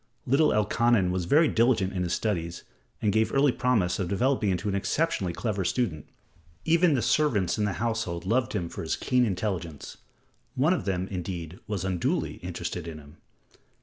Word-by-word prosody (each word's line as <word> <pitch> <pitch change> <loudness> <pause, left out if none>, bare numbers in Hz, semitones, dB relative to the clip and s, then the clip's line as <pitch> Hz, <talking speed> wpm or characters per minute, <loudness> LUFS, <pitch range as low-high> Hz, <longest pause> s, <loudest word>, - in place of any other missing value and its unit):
Little 140 +5 +4
Elkanan 105 -2 +2
was 90 -1 -1
very 155 - +5
diligent 115 -7 +2
in 90 - -2
his 90 -1 -1
studies 85 -6 -2 0.4
and 105 -2 +2
gave 110 0 +2
early 140 0 +4
promise 115 -9 +1
of 95 - -1
developing 115 +3 +1
into 95 +3 -1
an 100 - 0
exceptionally 100 - 0
clever 100 +1 -2
student. 90 - -1 0.6
Even 165 -1 +4
the 120 - 0
servants 115 - +1
in 105 - +2
the 100 - -1
household 110 -7 -2
loved 120 +5 +1
him 90 -5 -2
for - - -7
his 80 - -1
keen 125 -1 +1
intelligence. 90 -7 -4 0.6
One 150 +7 +3
of 185 - -2
them, 95 -1 -1
indeed, 90 -2 -5
was 100 -3 -3
unduly 90 -3 -1
interested 85 -1 -5
in 80 -2 -6
him. 75 -1 -14
100 Hz, 175 wpm, -27 LUFS, 90-120 Hz, 0.6 s, very